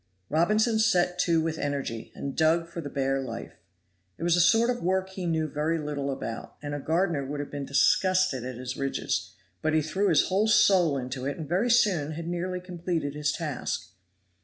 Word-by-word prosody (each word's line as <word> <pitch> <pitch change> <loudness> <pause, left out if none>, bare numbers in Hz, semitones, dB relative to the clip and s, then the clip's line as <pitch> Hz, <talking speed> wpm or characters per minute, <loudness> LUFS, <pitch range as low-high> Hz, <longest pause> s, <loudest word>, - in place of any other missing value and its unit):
Robinson 215 +8 +2
set 180 -5 +2
to 170 -2 +3
with 160 0 -2
energy, 140 -6 -3
and 140 - -5
dug 165 +1 +3
for 170 0 -6
the 145 - -6
bare 135 0 0
life. 130 - -7 0.6
It - - -7
was 175 0 +3
a 175 - +4
sort 225 +7 +4
of 245 - -4
work 190 +2 0
he 185 -2 -4
knew 160 -1 0
very 155 +3 -1
little 145 -2 -3
about, 115 -4 -5
and 145 -1 -5
a 145 - -3
gardener 165 0 0
would 145 +2 -5
have 145 - -5
been 140 -1 -5
disgusted 185 0 +3
at 130 0 -5
his 130 0 -5
ridges, 135 0 -2 0.3
but 155 0 +1
he 155 - +4
threw 195 +6 0
his - - +3
whole 200 +4 +2
soul 190 -8 +4
into 130 0 -4
it 140 - -3
and 160 -3 -6
very 190 - +1
soon 180 -10 +3
had 165 +1 -6
nearly 180 +1 -2
completed 175 -5 -3
his 150 0 0
task. 150 -11 -4
160 Hz, 200 wpm, -27 LUFS, 145-180 Hz, 0.6 s, a